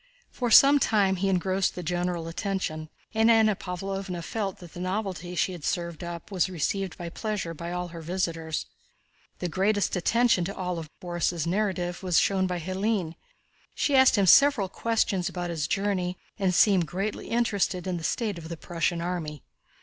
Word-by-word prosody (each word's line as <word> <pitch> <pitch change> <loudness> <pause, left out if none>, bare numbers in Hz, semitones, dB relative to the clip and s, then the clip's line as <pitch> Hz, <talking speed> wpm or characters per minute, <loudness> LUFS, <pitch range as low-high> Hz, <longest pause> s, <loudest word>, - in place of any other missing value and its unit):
For 245 -2 -2
some 280 +5 +8
time 200 -6 +2
he 195 +2 0
engrossed 190 +1 +1
the 180 - -5
general 175 0 -2
attention, 165 -4 -3 0.2
and 225 +1 +4
Anna 220 -2 +5
Pávlovna 185 -1 -5
felt 200 0 -3
that 175 -3 -13
the - - -8
novelty 185 -2 -3
she 185 - +1
had 175 -4 -8
served 170 -1 -2
up 170 +2 -7
was 185 -1 +1
received 190 +2 -2
with 170 -1 -7
pleasure 210 -6 -3
by 170 +2 -6
all 180 0 -3
her 165 -1 -8
visitors. 165 -2 -2 0.7
The 180 - -3
greatest 200 +5 +1
attention 195 0 +2
of 200 - -7
all 180 -2 -2
to 155 - -14
Borís' 175 -2 -1
narrative 180 -1 -1
was 180 -3 +1
shown 190 -1 +3
by 180 -1 -2
Hélène. 185 0 -1 0.6
She 285 - +1
asked 265 -1 +6
him 200 - +4
several 225 - +6
questions 200 -4 0
about 175 -1 -4
his 155 -3 -2
journey 185 -2 -1 0.2
and 190 -2 +2
seemed 185 -2 +4
greatly 195 +5 -3
interested 205 -6 0
in 185 -2 -2
the 165 - -7
state 210 0 -1
of 160 -1 -9
the 170 - -5
Prussian 170 +1 -2
army. 170 -4 -4
185 Hz, 175 wpm, -27 LUFS, 170-200 Hz, 0.7 s, some